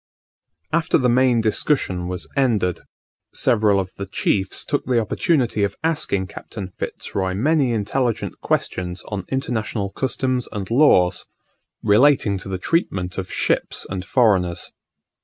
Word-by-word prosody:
After 165 0 +3
the 125 -3 +2
main 125 -2 +4
discussion 105 -5 0
was 90 0 -5
ended, 110 -10 +1 0.6
several 105 -3 +3
of 95 -1 -4
the 100 - -5
chiefs 95 0 -1
took - - -1
the 125 -2 +3
opportunity 115 -1 +1
of 100 -1 -1
asking 150 -12 0
Captain 95 +1 -8
Fitz - - -6
Roy 95 -1 -1
many 140 +3 +2
intelligent 115 +2 -1
questions 90 0 -2
on 100 -3 -4
international 110 -6 -2
customs 130 0 -1
and 100 0 -5
laws, 95 -10 +4 0.6
relating 110 -2 +4
to 95 - -8
the 95 - -2
treatment 95 - -1
of 95 - -6
ships - - -1
and 95 -1 -3
foreigners. 95 -7 +1
105 Hz, 135 wpm, -21 LUFS, 95-130 Hz, 0.6 s, main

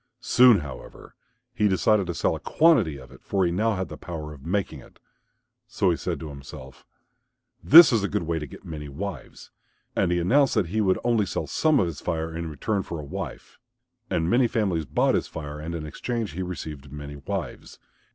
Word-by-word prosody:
Soon, 125 -5 +6
however, 75 -3 -10 0.4
he 105 -3 +2
decided 100 +1 +2
to 85 - -3
sell - - +1
a - - -7
quantity 130 - +3
of 65 -2 -13
it, - - -15
for 95 -2 0
he 85 - +1
now 110 +5 +1
had 95 0 -3
the - - -9
power 80 -3 -7
of 70 -2 -14
making 100 +2 -2
it. - - -17 0.7
So - - +1
he - - +1
said - - -4
to 80 - -6
himself, 70 -1 -11 0.8
"This 160 -1 +9
is 115 - +3
a - - +1
good 85 - -2
way 85 0 -2
to 75 - -6
get - - -13
many 75 -3 -7
wives," 95 +7 -7 0.4
and 95 -3 +1
he 90 - +2
announced 130 +12 +3
that 100 -7 +1
he 110 +4 0
would 95 -3 +2
only 115 -4 +2
sell 80 - -3
some 150 - +2
of 95 - +3
his 85 -4 -6
fire 80 -1 -3
in 85 -1 -4
return 100 +7 -2
for 85 -3 -6
a - - -6
wife. - - -7 0.5
And 80 - 0
many 120 +6 +3
families 95 -9 -1
bought - - +1
his - - 0
fire 75 -1 -7
and 80 +2 -5
in 80 -2 -5
exchange 115 +6 -4
he 90 +5 -5
received 75 -6 -6
many 75 0 -8
wives. 85 -1 -6
85 Hz, 210 wpm, -25 LUFS, 75-105 Hz, 0.8 s, This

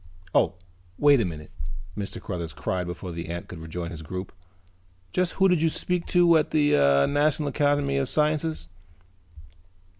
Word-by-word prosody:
"Oh, - - +3 0.4
wait 145 -3 +5
a - - +1
minute," 75 -3 -7 0.4
Mr. 100 -2 -5
Cruthers 85 -4 -5
cried 90 +3 -2
before 90 +1 -6
the 85 0 -6
ant 85 0 -5
could 90 - -9
rejoin 85 +2 -5
his 80 -3 -7
group. 90 +4 -6 0.8
"Just 180 -1 +1
who 195 - +4
did 180 -4 +2
you 165 - +3
speak 180 +2 -2
to 175 -2 +5
at 150 - -1
the 150 -1 +2 0.3
National 145 0 +1
Academy 145 -1 +1
of 135 -2 0
Sciences?" 155 - +1
140 Hz, 155 wpm, -26 LUFS, -, 0.8 s, wait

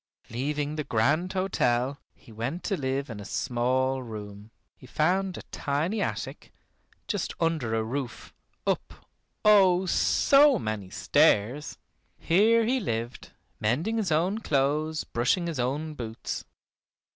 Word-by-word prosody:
Leaving 145 +4 -2
the 150 - -1
grand 145 +11 +1
hotel 140 -8 0 0.2
he 120 - -18
went 120 +11 -4
to 200 - 0
live 135 -2 -2
in 110 -4 -7
a - - -7
small 130 +4 0
room. 105 -3 -8 0.3
He 130 - -15
found 185 +7 0
a - - -8
tiny 160 +9 -1
attic, - - -4 0.6
just 205 -5 -2
under 160 -9 0
a 110 - 0
roof, 125 +2 -5 0.3
up, - - -3 0.4
oh! 190 -3 +6
so 275 +8 +4
many 110 - -4
stairs. 120 +10 +2 0.4
Here 220 +6 +4
he 255 +3 +1
lived, 115 - -4 0.3
mending 155 - 0
his 200 -6 -1
own 180 +7 +1
clothes, 150 -1 0
brushing 125 +10 0
his 165 -5 -3
own 145 +6 -1
boots. 115 -5 -5
145 Hz, 130 wpm, -27 LUFS, 120-180 Hz, 0.6 s, oh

